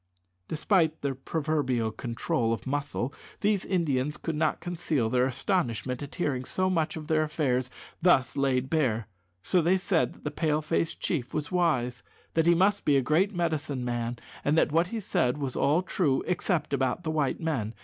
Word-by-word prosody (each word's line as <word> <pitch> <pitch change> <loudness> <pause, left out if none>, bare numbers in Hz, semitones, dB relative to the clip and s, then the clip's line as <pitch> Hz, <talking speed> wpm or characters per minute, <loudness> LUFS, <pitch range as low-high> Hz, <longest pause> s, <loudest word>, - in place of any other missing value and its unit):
Despite 160 -1 +1
their 140 -1 0
proverbial 135 -5 -1
control 115 +2 -1
of 115 - -5
muscle, 140 -1 -2 0.3
these 205 -2 +2
Indians 150 -6 0
could 165 - -3
not 155 0 +1
conceal 160 -9 -1
their 125 0 +3
astonishment 130 - -1
at 145 0 -7
hearing 140 -8 -1
so 185 +7 0
much 160 -3 0
of 155 - -6
their 155 0 +2
affairs 135 -5 0 0.3
thus 160 -8 +4
laid 135 -2 +1
bare; 125 -8 0 0.4
so 180 - +3
they 175 +4 +3
said 185 -2 +1
that - - -20
the 150 - -2
Pale 155 0 0
face 165 +1 0
chief 140 -7 -2
was 155 +1 -2
wise, 130 -9 +1 0.3
that 165 0 +2
he 170 - +6
must 195 +4 +3
be 145 -2 +4
a - - +3
great 180 +9 +2
medicine 155 -6 -1
man, 120 0 -2 0.3
and 150 +3 +2
that 160 - +3
what 165 +3 +3
he 225 +4 -4
said 125 -9 0
was 135 -3 -3
all 155 +6 +2
true 150 -8 +1
except 175 -4 -1
about 130 +5 0
the 155 - -1
white 150 -4 0
men. 125 -10 -2
150 Hz, 180 wpm, -28 LUFS, 130-165 Hz, 0.4 s, he